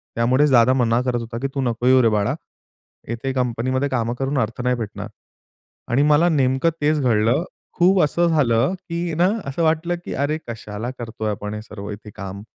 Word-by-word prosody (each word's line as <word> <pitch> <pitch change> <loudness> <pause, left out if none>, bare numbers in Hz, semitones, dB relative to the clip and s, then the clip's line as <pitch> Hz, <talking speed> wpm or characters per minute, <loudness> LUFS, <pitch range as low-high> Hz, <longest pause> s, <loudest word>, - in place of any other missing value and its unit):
त्यामुळेच 130 +5 +3
दादा 125 0 +5
मना 120 -2 +2
करत 125 -1 -1
होता, 115 0 -6
की 135 - 0
"तू 135 - 0
नको 120 0 -1
येऊ 130 0 +6
रे 115 - +4
बाळा, 105 -1 +1 0.8
इथे 130 +3 -3
कंपनीमध्ये 130 +2 -1
कामं 120 -3 -1
करून 135 +1 -1
अर्थ 115 +1 -2
नाही 125 0 +2
भेटणार." 115 -4 -6 0.8
आणि 135 +4 +3
मला 165 +4 +5
नेमकं 135 +1 +2
तेच 150 +1 +2
घडलं. 115 +4 +2 0.3
खूप 185 +2 +4
असं 170 +4 +2
झालं, 135 -2 +2 0.2
की 170 0 -2
ना 175 +4 +3 0.2
असं 140 +5 -2
वाटलं, 165 +2 +1
की - - -5
"अरे 145 +3 0
कशाला 110 +1 -5
करतोय 110 -2 -4
आपण 105 0 -5
हे 105 - -5
सर्व 105 -2 -9
इथे 105 +1 -9
काम?" 100 +1 -7
125 Hz, 185 wpm, -21 LUFS, 115-145 Hz, 0.8 s, येऊ